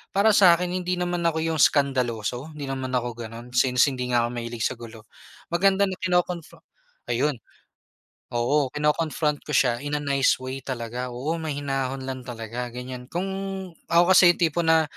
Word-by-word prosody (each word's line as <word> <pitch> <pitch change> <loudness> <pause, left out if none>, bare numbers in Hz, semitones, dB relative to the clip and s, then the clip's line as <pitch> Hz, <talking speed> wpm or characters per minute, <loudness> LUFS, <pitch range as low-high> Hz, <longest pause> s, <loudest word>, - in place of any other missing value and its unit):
para 210 +2 +5
sa'kin 180 -2 +5
hindi 180 0 -1
naman 175 -1 -1
ako 160 -1 -2
'yong 160 -2 -1
eskandaloso, 125 -1 +1
hindi 145 - -5
naman 130 -1 -3
ako 125 -1 -1 0.2
gano'n, 120 +2 -11
since, 125 +1 +4
hindi 125 -1 -4
nga 120 - +4
ako - - -3
mahilig 115 -1 -4
sa - - 0
gulo. 110 -2 -11 0.5
Maganda 195 +2 +3
na 190 - -3
kino-confro 180 -2 -1 0.4
ayun, 150 -2 0 1.0
oo, 135 +4 +2
kino-confront 150 0 0
ko - - -19
siya 120 -3 +3
in 145 0 -3
a 145 - -4
nice 140 -1 +3
way 130 +1 -6
talaga, 125 -1 -4
oo, 145 +7 -3
mahinahon 135 -3 -3
lang 130 -1 -5
talaga, 120 +1 -5
ganiyan. 125 +1 -8
Kung 175 +2 -2 0.7
ako 175 +2 +5
kasi 180 -1 +8
'yong - - -19
tipo 165 +1 +1
na, 160 -1 +4
135 Hz, 170 wpm, -25 LUFS, 125-165 Hz, 1.0 s, kasi